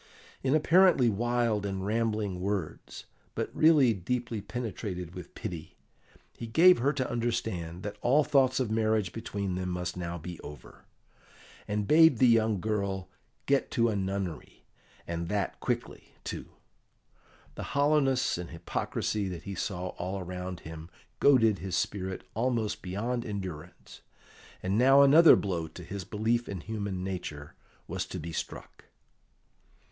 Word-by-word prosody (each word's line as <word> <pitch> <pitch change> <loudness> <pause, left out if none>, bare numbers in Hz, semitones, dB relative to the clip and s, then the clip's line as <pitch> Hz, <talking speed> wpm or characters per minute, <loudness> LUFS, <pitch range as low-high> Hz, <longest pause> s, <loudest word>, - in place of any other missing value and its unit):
In 135 +2 +2
apparently 165 -5 +5
wild 120 -1 0
and 95 -1 -3
rambling 105 -3 -1
words, 95 -5 -4 0.3
but - - -3
really 150 -7 +5
deeply 115 +3 -3
penetrated 100 -5 -5
with 90 -1 -10
pity, 85 -3 -7 0.6
he 115 - -7
gave 170 +9 +6
her 135 +4 +2
to 135 -4 -2
understand 95 -8 -2
that 105 0 -6
all 140 +5 +4
thoughts 135 -2 +3
of 125 -5 -1
marriage 110 -4 +1
between 100 -4 -3
them 90 0 -3
must 90 0 -3
now 85 -1 -4
be 85 +1 -8
over, 75 -4 -12 0.8
and 105 -1 -1
bade 160 -3 +6
the 130 - +5
young 110 -3 +3
girl 100 -2 -2 0.4
get 140 0 +2
to 115 -2 +2
a 110 - -1
nunnery, 95 -4 -4 0.4
and 85 0 -4
that 100 -1 -2
quickly, - - -4
too. - - -6 1.0
The - - -7
hollowness 140 - +2
and 90 - -6
hypocrisy 95 +4 -2
that 90 -2 -7
he 100 - -5
saw 90 -1 -3
all 95 +3 -3
around 90 -1 -6
him 80 +1 -9 0.3
goaded 115 -7 +5
his 95 -2 -2
spirit 95 +1 -2
almost 115 -2 -1
beyond 115 +6 -2
endurance, 95 -7 -7 0.6
and 95 +4 +1
now 135 +3 +7
another 155 +4 +8
blow 85 -5 -2
to 85 +3 -11
his 95 +2 -6
belief 115 +3 0
in 95 -4 -5
human 100 -3 -4
nature 85 -6 -5 0.3
was - - -3
to - - -6
be 85 +2 -6
struck. - - -7
105 Hz, 140 wpm, -29 LUFS, 90-120 Hz, 1.0 s, another